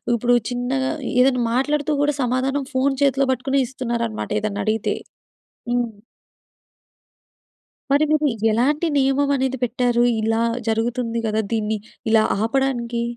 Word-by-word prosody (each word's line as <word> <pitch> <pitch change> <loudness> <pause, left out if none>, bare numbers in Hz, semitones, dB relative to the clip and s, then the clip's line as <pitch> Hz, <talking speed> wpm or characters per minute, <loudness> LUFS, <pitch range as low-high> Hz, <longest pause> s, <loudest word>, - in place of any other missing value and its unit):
ఇప్పుడు 245 +1 +2
చిన్నగా 255 +2 -1 0.3
ఏదైనా 255 -1 +3
మాట్లాడుతూ 295 +3 0
కూడా 290 -1 +1
సమాధానం 260 +3 0
ఫోను 270 +1 +1
చేతిలో 275 -1 +2
పట్టుకునే 270 +2 0
ఇస్తున్నారనమాట 235 -3 -3
ఏదన్నడిగితే. 215 +1 -1 0.8
హ్మ్. 240 -3 -1 1.9
మరి 285 +2 +4
మీరు 305 -1 +3 0.2
ఎలాంటి 290 +9 +1
నియమం 275 +1 +2
అనేది 265 0 -1
పెట్టారు? 240 0 +1 0.2
ఇలా 225 +1 +1 0.3
జరుగుతుంది 230 +1 -1
కదా! 215 +1 0
దీన్ని 215 -1 0 0.3
ఇలా 220 -1 +5 0.2
ఆపడానికి? 235 -1 0
250 Hz, 110 wpm, -21 LUFS, 230-270 Hz, 1.9 s, ఇలా